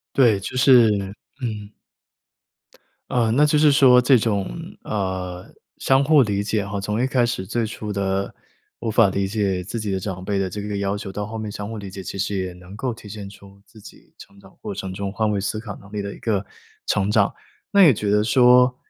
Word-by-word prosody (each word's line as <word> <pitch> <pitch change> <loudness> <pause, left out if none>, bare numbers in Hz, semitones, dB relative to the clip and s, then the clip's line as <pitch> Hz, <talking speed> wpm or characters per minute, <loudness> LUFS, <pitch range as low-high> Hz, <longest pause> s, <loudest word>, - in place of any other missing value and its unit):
对， 115 -7 +4
就 100 +6 -7
是 125 -3 +6 0.5
嗯。 105 -4 -4 1.4
呃， 120 -2 +1
那 145 +5 +4
就 150 0 +2
是 150 -1 +5
说 130 -3 +6
这 125 +1 +5
种， 105 -3 0 0.4
呃， 95 -3 -4 0.3
相 135 +1 +3
互 145 -2 +5
理 100 -2 -1
解 105 0 -1
哈， 100 0 -4
从 105 +3 -2
一 - - +2
开 130 -2 +1
始 120 -6 -2
最 115 +4 -1
初 105 -1 -6
的 100 0 -2 0.5
无 115 - -3
法 110 -2 +4
理 100 0 -1
解 95 -3 -1
自 115 - -5
己 105 -2 -3
的 95 - -1
长 95 -1 -6
辈 100 0 -1
的 95 -1 -1
这 105 - -6
个 105 0 -4
要 100 0 -1
求， 100 -1 -7
到 105 +1 -4
后 110 +2 -7
面 110 -1 -5
相 105 +1 -6
互 115 - -6
理 100 -2 -7
解， 95 +1 -8
其 95 - -7
实 100 +1 -2
也 95 -1 -3
能 90 +2 -13
够 125 +4 -2
体 105 - -13
现 100 -1 -8
出 100 0 -16
自 110 +1 -18
己 - - -16
成 100 - -15
长 95 -1 -19
过 - - -6
程 95 -1 -5
中 100 +1 -5
换 110 +1 0
位 105 -1 0
思 105 +2 -3
考 105 -3 -7
能 100 - -16
力 105 - -2
的 100 0 -6
一 - - -13
个 105 -4 -1 0.4
成 95 +2 +1
长。 - - +3 0.4
那 200 -1 +6
也 150 -7 +7
觉 105 -1 -3
得 105 +1 +3
说 125 +2 +5
105 Hz, 240 characters per minute, -22 LUFS, 100-115 Hz, 1.4 s, 也